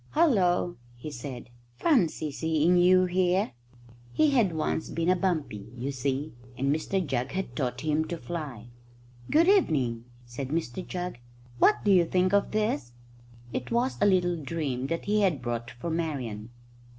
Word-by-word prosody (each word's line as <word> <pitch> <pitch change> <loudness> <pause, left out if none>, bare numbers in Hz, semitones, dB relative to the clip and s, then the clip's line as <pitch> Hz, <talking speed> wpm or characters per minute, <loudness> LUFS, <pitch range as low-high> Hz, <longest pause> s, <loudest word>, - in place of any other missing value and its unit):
"Hullo!" 185 - +3 0.2
he 135 +6 -8
said; 125 -2 -8 0.3
"fancy 175 - +2
seeing 160 +3 +2
you 185 +1 +5
here!" 185 +2 +1 0.6
He 305 - +3
had 235 -9 +3
once 160 0 -2
been 165 +1 -1
a - - +4
bumpy, 155 - -2
you 130 +4 -3
see, 135 +2 -2 0.2
and 140 +3 +1
Mr 185 +4 -1
Jugg 130 -2 -2
had 185 -10 -3
taught 125 -2 -2
him 155 0 +1
to 170 +1 -4
fly. 145 -10 -6 0.6
"Good 330 +3 +4
evening," 135 - +2 0.2
said 120 +3 -6
Mr 160 +1 -3
Jugg; 180 -7 -5 0.4
"what 120 - +4
do - - +4
you 180 -3 +6
think 185 +2 +1
of 200 0 +3
this?" 210 - -1 0.6
It 125 - -3
was 240 +3 0
a 205 - +5
little 175 -3 +2
dream 135 -3 -3
that 165 +3 -3
he 210 +1 +2
had 180 -8 +2
brought 120 -1 -4
for 140 +8 -6
Marian. 130 -10 -3
160 Hz, 160 wpm, -28 LUFS, 130-185 Hz, 0.6 s, you